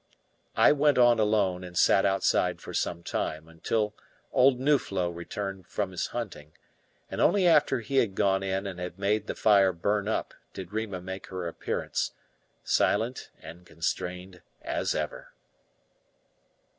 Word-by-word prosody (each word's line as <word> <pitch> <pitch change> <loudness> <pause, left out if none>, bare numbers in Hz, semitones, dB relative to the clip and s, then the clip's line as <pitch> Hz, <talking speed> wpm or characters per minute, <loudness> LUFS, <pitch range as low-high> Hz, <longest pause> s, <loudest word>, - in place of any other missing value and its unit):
I - - +6
went 145 -1 +3
on 120 -2 +5
alone, 100 -4 +1
and 90 -1 -8
sat 95 - +5
outside 95 -1 +1
for - - -9
some 85 - -2
time, 80 -1 -3
until 105 +6 -2 0.4
old 130 -1 +4
Nuflo 110 -11 +1
returned 95 +2 -6
from 95 +1 -3
his 90 - -2
hunting; 90 -11 -6 0.6
and - - -2
only 200 -3 +4
after 150 -7 +4
he 125 +5 -3
had 105 -7 +2
gone 95 0 +2
in 95 0 -2
and 95 -2 -6
had 90 0 -6
made 105 +2 0
the - - -3
fire 100 -3 +4
burn 100 +4 -1
up 110 - -2 0.2
did 95 +1 -8
Rima 110 -4 -3
make 95 +1 -7
her 90 -2 -5
appearance, 85 - -3 0.5
silent 115 +5 0
and 85 +3 -10
constrained 90 +2 -4 0.2
as - - -1
ever. - - -5
95 Hz, 145 wpm, -28 LUFS, 90-110 Hz, 0.6 s, I